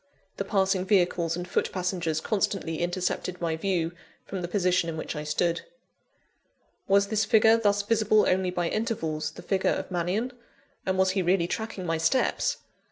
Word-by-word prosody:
The - - -1
passing 190 -1 +1
vehicles 175 -4 +2
and 175 0 -5
foot - - 0
passengers 175 -4 -1
constantly 195 -6 -1
intercepted 180 0 -2
my 165 -2 -1
view, 170 -1 -1 0.3
from 190 - -5
the 175 - -3
position 180 -2 +1
in 160 - -4
which 155 - -4
I 150 - -4
stood. 165 +3 0 1.3
Was 200 +1 +4
this 215 0 +2
figure, 220 +2 +5
thus 205 -3 +2
visible 215 0 +3
only 185 0 +2
by 175 -1 -1
intervals, 165 -9 -2
the 175 - -12
figure 190 +1 +1
of - - -2
Mannion? 185 +8 -1 0.6
and 190 0 +1
was 190 0 +3
he 190 0 0
really 180 0 +2
tracking 220 0 -4
my 165 -1 0
steps? 165 +11 +1
185 Hz, 165 wpm, -27 LUFS, 170-200 Hz, 1.3 s, figure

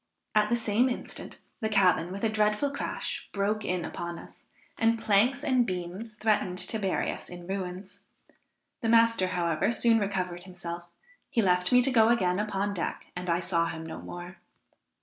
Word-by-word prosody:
At 210 0 +3
the 240 - +3
same 230 +2 +2
instant, 245 - -6 0.2
the 220 -3 -1
cabin, 185 -4 +3
with 200 +3 -6
a 225 - +3
dreadful 215 +5 +1
crash, 280 - -4
broke 210 +2 0
in 180 -1 -1
upon 170 0 -5
us, - - -13 0.3
and 230 0 +2
planks 225 +6 +2
and 255 -4 +3
beams 185 +3 -5
threatened 210 -4 +1
to 200 +4 -2
bury 195 -3 0
us - - -8
in 175 -1 -9
ruins. 190 0 -5 0.8
The 225 - 0
master, 230 -4 +4
however, 175 +2 0
soon 230 0 +3
recovered 185 -3 -2
himself; 175 -2 -7 0.4
he 230 - +2
left 180 -1 +3
me 250 0 +6
to 270 - +3
go 225 -3 +5
again 185 -6 +2
upon 205 -1 -1
deck, 180 - -4
and 180 0 -4
I 170 +1 +2
saw 170 -2 +1
him 160 -1 -5
no 160 - -7
more. 175 +1 -8
200 Hz, 175 wpm, -28 LUFS, 180-225 Hz, 0.8 s, me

